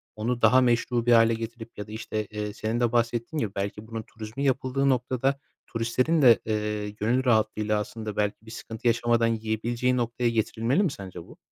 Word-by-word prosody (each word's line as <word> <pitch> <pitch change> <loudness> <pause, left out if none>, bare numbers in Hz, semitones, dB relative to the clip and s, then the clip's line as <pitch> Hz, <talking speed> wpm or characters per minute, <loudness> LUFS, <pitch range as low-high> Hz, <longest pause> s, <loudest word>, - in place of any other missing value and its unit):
onu 120 +3 -2
daha 125 +4 +6
meşru 120 -1 +1
bir 120 - +3
hâle 115 0 +6
getirip 115 0 -7
ya 105 - -6
da, - - -11
işte, 110 -1 -4
eee, 105 0 -5
senin 110 +3 -2
de 120 -2 +2
bahsettiğin 120 +5 0
gibi 110 -8 -1
belki 100 +2 -4
bunun 115 0 -5
turizmi 110 +4 -7
yapıldığı 135 0 +1
noktada 130 +2 0 0.3
turistlerin 125 +8 +1
de, 120 -4 +7
eee, 105 -1 -2
gönül 115 +5 0
rahatlığıyla, 110 -2 +2
aslında, 110 0 -5
belki 105 +1 -1
bir 110 - -11
sıkıntı 115 0 -5
yaşamadan 120 0 +3
yiyebileceği 115 +3 0
noktaya 120 0 0
getirilmeli 115 - +1
mi 180 - +1
sence 95 -7 -8
bu? - - -16
115 Hz, 180 wpm, -26 LUFS, 110-120 Hz, 0.3 s, de